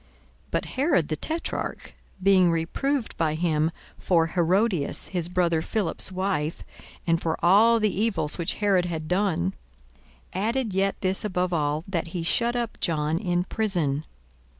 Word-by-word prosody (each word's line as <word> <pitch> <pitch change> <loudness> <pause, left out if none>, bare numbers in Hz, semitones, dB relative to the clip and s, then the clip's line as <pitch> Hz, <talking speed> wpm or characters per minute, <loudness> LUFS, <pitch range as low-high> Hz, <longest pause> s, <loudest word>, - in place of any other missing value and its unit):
42:003:019 - - -31 0.4
But - - -1
Herod 260 - +1
the 155 - 0
tetrarch, 320 - -4 0.3
being 190 -2 +5
reproved 220 - -1
by 155 -2 +1
him 160 -1 +1 0.3
for 170 -3 +3
Herodias 180 0 +1
his 175 -2 -2
brother 175 -3 +1
Philip's 195 -1 -1
wife, 185 -5 -2 0.4
and 165 -1 +2
for 160 -1 -1
all 225 +6 +6
the 215 -3 +1
evils 195 -8 -1
which 170 - 0
Herod 195 -4 +2
had 160 -3 -4
done, 180 - +1 0.8
42:003:020 185 - -2
Added 235 -3 -1
yet 195 +1 +1
this 190 0 +1
above 180 -3 -1
all, 150 -1 0
that 175 -4 -2
he 170 0 -4
shut 235 +8 +2
up 235 -2 -3
John 155 -1 0
in 175 -1 0
prison. 175 -9 0
180 Hz, 150 wpm, -25 LUFS, 165-200 Hz, 0.8 s, all